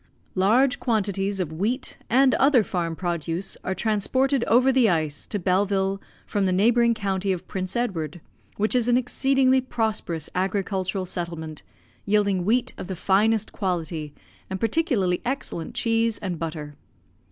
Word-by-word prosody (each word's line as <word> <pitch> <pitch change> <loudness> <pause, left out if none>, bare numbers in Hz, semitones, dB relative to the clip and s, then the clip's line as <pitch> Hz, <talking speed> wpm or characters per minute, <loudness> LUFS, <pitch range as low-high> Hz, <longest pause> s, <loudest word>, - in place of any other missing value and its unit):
Large 245 +8 +3
quantities 200 -4 0
of 165 -4 -2
wheat 215 - -2
and 260 +2 +4
other 270 -4 +4
farm 170 -4 -2
produce 170 +1 -3
are 190 - -2
transported 250 +6 +1
over 250 +3 +4
the 250 -4 +4
ice 155 -4 -1
to 205 - -3
Belleville 195 +1 +1 0.2
from 200 -2 0
the - - +1
neighbouring 235 +5 +3
county 195 -2 -1
of 185 -1 -4
Prince 185 -1 -4
Edward, 175 - -2 0.4
which 215 +2 +1
is 245 -2 +2
an 245 0 +4
exceedingly 265 +1 +2
prosperous 220 - -2
agricultural 190 0 -1
settlement, 170 -3 -5 0.4
yielding 200 -3 +1
wheat 235 +4 +1
of - - -6
the 190 - -4
finest 215 +4 +2
quality, 165 -6 -3 0.4
and 190 0 -4
particularly 225 - +1
excellent 240 - -4
cheese 225 -1 +1
and 180 -4 -4
butter. 155 -3 -5
195 Hz, 140 wpm, -24 LUFS, 180-235 Hz, 0.4 s, and